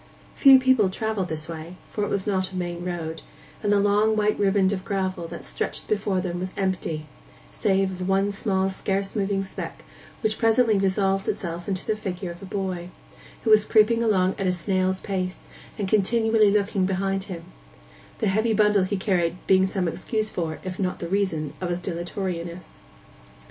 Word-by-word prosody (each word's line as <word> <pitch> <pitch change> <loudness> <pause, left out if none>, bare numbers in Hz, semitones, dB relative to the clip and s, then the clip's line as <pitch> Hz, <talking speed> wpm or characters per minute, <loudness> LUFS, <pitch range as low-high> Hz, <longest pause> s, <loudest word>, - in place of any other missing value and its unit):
Few 270 -2 +8
people 260 -6 +4
travelled 210 -1 -2
this 155 -1 -3
way, 165 +1 -7
for 210 - -3
it 205 - -1
was 195 -1 -1
not 190 -2 0
a - - -9
main 175 -1 -3
road; 165 -3 -4 0.4
and 205 - +1
the 205 - +4
long 205 +2 +3
white 210 0 +1
riband 195 -1 +3
of 185 -2 -4
gravel 190 -3 -2
that - - -8
stretched - - -2
before 200 -2 0
them 175 -1 -3
was 185 +1 -4
empty, 180 -5 -2 0.5
save 190 - +1
of 180 - -2
one 195 +1 +2
small 195 -1 0
scarce 195 +1 -2
moving 195 -1 0
speck, 190 - -7 0.4
which 220 -2 0
presently 225 -2 +4
resolved 195 0 +1
itself 170 -2 -4
into 190 -2 -2
the 215 - 0
figure 185 -3 -4
of 175 +3 -10
boy, 185 -3 -3 0.5
who 225 - +2
was 215 -1 +7
creeping 225 +2 +4
on 190 -4 +3
at 195 - 0
a - - +3
snail's 185 +1 0
pace, 185 -2 -3 0.3
and 200 - -2
continually 220 +1 +3
looking 200 -2 +1
behind 195 0 -1
him—the - - -10
heavy 220 +4 +2
bundle 210 -2 +4
he 200 +1 -2
carried 180 -3 0
being 190 0 +4
some 190 -2 -1
excuse 215 +5 -2
for, 160 -3 -3
if 185 -1 -6
not 185 -2 -1
the 170 - -5
reason 170 -6 -1
of, 180 - -2
his 175 - 0
dilatoriness. 175 -1 -5
190 Hz, 175 wpm, -25 LUFS, 180-205 Hz, 0.5 s, Few